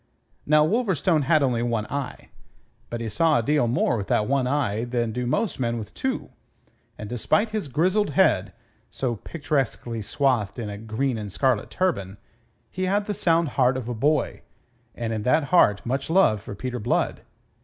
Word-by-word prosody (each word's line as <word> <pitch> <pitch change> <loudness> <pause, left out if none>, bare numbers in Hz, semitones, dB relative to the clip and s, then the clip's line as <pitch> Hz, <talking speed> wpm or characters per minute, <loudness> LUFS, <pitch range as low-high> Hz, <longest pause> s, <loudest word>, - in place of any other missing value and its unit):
Now 150 +1 +5
Wolverstone 180 - +1
had 155 0 +4
only 125 -3 +1
one 115 -3 -1
eye; 140 +2 -5 0.6
but 120 0 -4
he 115 - -3
saw 155 +8 +2
a 120 - 0
deal 145 -1 +2
more 120 0 +1
with 100 -2 -4
that 105 - +2
one 135 -2 +1
eye 125 -6 0
than 120 -2 -1
do 125 +2 -3
most 200 - -1
men 120 -2 0
with 105 -2 -7
two; 265 0 -3 0.7
and 105 - -7
despite 125 - +1
his 215 -7 -3
grizzled 185 - +1
head 145 - +2 0.4
so 120 -4 -2
picturesquely 135 -6 -2
swathed 120 -2 0
in 110 -4 -4
a 100 - -6
green 115 +3 -2
and 105 -2 -6
scarlet 115 +2 +1
turban 100 - -1 0.5
he 185 0 -2
had 200 +2 +1
the 210 - -2
sound 165 -4 +2
heart 130 0 +2
of 125 -3 -5
a 120 - -2
boy, 145 +6 0 0.5
and 115 -1 -3
in 110 - -2
that 150 +8 +2
heart 105 - +4
much 135 +5 -2
love 160 - +4
for 100 - -8
Peter 125 +3 -4
Blood. 115 +3 0
130 Hz, 180 wpm, -24 LUFS, 115-155 Hz, 0.7 s, Now